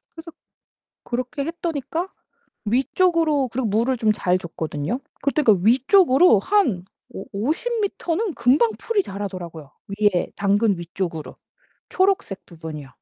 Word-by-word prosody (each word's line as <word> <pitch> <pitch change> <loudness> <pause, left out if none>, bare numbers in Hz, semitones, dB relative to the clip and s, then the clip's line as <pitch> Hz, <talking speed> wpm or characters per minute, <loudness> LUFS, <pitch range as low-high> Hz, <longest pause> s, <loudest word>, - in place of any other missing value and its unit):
그래서 330 0 -10 0.7
그렇게 255 +3 -3
했더니까 330 +1 -3 0.6
위쪽으로 295 - +2
그리고 240 0 -2
물을 230 +5 +1
좀 220 -2 +2
잘 180 -3 +1
줬거든요. 165 - -4 0.2
그럴 280 - +1
때 305 - +1
그러니까 200 -6 +3
위쪽으로 270 - +5
한 245 - +1 0.3
오 195 - -7
오십 320 - -1
미터는 390 -1 -2
금방 265 - +3
풀이 430 -4 0
자라더라고요. 185 - -7 0.3
위에 205 -4 +2
당근 200 0 +2
위쪽으로. 170 -2 -5 0.5
초록색 375 - 0
부분이요. 160 -4 -8
240 Hz, 315 characters per minute, -22 LUFS, -, 0.7 s, 위쪽으로